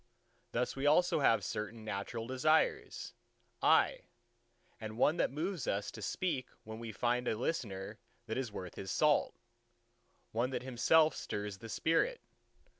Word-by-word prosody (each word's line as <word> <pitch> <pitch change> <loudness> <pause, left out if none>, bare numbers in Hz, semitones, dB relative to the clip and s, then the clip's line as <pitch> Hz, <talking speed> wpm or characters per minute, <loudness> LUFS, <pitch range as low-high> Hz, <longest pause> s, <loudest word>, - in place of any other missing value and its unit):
Thus 125 +1 -1
we 135 +2 0
also 175 +3 +4
have 115 -7 +4
certain 105 +3 -4
natural 110 +2 -4
desires, 130 +6 +1 0.5
aye, - - +4 0.8
and 110 0 -6
one 150 +6 +3
that - - +2
moves 165 +3 -3
us 100 +1 -1
to 110 - -9
speak 130 - -1 0.2
when 110 +1 -8
we 115 -1 -6
find 120 +3 0
a 110 - 0
listener 110 -7 -3 0.3
that 110 -1 -3
is 130 -4 -2
worth 90 -4 -6
his 95 - -7
salt: - - +3 1.0
one 120 +3 0
that 130 - -3
himself 155 +5 +4
stirs 105 -1 -4
the 115 - -9
spirit. 320 - +1
120 Hz, 145 wpm, -34 LUFS, 105-145 Hz, 1.0 s, also